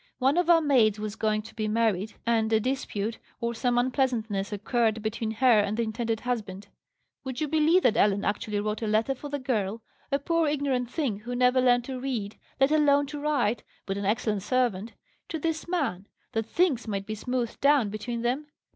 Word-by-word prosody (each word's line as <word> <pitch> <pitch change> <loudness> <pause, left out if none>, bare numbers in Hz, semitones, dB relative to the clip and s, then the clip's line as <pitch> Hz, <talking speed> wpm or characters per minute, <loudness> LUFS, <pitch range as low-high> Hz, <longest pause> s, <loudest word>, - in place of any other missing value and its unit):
One 270 +3 +2
of 355 -1 +2
our 335 -1 +7
maids 240 -8 +3
was 210 0 -4
going 215 -1 0
to 220 - -12
be 215 -1 -2
married, 215 -2 0
and 225 -1 +1
a 220 - +4
dispute, 225 -3 -2 0.2
or 235 0 -1
some 240 +1 0
unpleasantness 240 -6 0
occurred 220 +1 0
between 220 0 -2
her 230 0 +4
and 205 +1 0
the 235 - +1
intended 225 0 -2
husband. 210 -6 -4 0.5
Would 260 -2 -5
you 305 - 0
believe 315 +4 +3
that 225 - +4
Ellen 200 -2 +2
actually 210 0 -1
wrote 210 +1 -3
a 220 - -1
letter 220 +5 +2
for 290 +2 -8
the 285 - -2
girl 225 -5 -2 0.3
(a 275 - +3
poor 330 +3 +1
ignorant 275 -4 0
thing, 250 -8 -2
who 240 +3 -5
never 250 +1 +4
learnt 245 -1 +3
to 260 -1 -5
read, 235 -6 -4 0.2
let 270 +2 +4
alone 285 -2 +4
to 295 +1 -6
write, 250 -7 0 0.2
but 195 - -2
an 200 0 -3
excellent 210 0 0
servant) 230 -2 0 0.4
to 325 - -2
this 320 +1 -2
man, 265 - -2 0.2
that 225 0 -2
things 285 -6 +1
might 200 -2 -3
be 215 - -4
smoothed 240 +2 -3
down 280 -7 +4
between 230 +2 -4
them? 260 +5 -1
235 Hz, 200 wpm, -27 LUFS, 215-270 Hz, 0.5 s, our